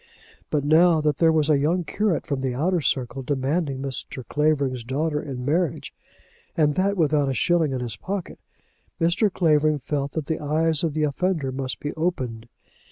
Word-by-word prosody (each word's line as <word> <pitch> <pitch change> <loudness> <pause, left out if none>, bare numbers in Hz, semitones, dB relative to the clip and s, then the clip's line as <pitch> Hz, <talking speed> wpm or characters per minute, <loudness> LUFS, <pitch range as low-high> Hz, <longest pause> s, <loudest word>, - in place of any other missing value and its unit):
But 145 -2 0
now 160 +2 +5
that 150 -2 0
there 165 -1 +4
was 155 -2 +2
a 150 -3 +3
young 170 +5 +1
curate 195 +2 -1
from 140 -2 -2
the 130 -2 -2
outer 170 +5 +1
circle 135 -1 -1
demanding 140 +1 -1
Mr. 130 -2 -4
Clavering's 140 -5 0
daughter 150 +5 -1
in 130 -4 -6
marriage, 160 +2 -1 0.6
and 150 -2 +3
that 195 +4 0
without 150 -4 +2
a 135 - -1
shilling 160 +6 +2
in 130 -1 -2
his 115 -4 -4
pocket, 195 - -5 0.6
Mr. 175 +5 +2
Clavering 155 -4 +2
felt 140 0 -3
that 160 -3 -3
the 160 +2 -2
eyes 155 +1 +1
of 160 -3 -1
the 155 - +1
offender 150 -1 0
must 130 0 -4
be 145 - -4
opened. 125 -9 -3
150 Hz, 175 wpm, -24 LUFS, 135-165 Hz, 0.6 s, now